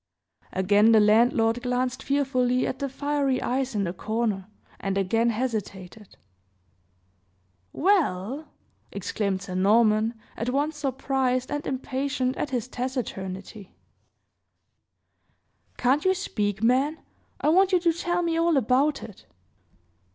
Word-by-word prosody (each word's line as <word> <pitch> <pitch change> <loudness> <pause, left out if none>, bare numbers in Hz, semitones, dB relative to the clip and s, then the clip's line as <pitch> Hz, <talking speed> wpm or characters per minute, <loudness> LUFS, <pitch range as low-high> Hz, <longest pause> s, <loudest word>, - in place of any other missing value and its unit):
Again 205 +4 +4
the 220 - +7
landlord 225 +2 +3
glanced 250 0 -1
fearfully 255 -3 +1
at 260 - -3
the 275 - -2
fiery 280 -1 0
eyes 260 -1 -2
in 205 - +1
the 175 -2 -2
corner, 215 -1 -2 0.3
and 195 0 -2
again 225 +5 +1
hesitated. 210 -4 -5 1.5
"Well!" 290 - 0 0.4
exclaimed 195 -3 -2
Sir 185 - -7
Norman, 215 +4 +3 0.2
at 230 +3 -3
once 290 +4 0
surprised 265 -2 -1
and 290 0 -3
impatient 265 0 -2
at 295 - -3
his 250 -2 -2
taciturnity, 210 -6 -5 2.0
"Can't 265 +4 +2
you 375 0 +3
speak 210 - -2
man? 265 +6 +2 0.4
I - - +1
want 380 +4 +4
you 365 - +4
to 335 -1 +3
tell 350 +1 -1
me 335 -1 0
all 335 -2 +3
about 270 +4 +2
it." 210 - -12
250 Hz, 120 wpm, -25 LUFS, 215-280 Hz, 2.0 s, the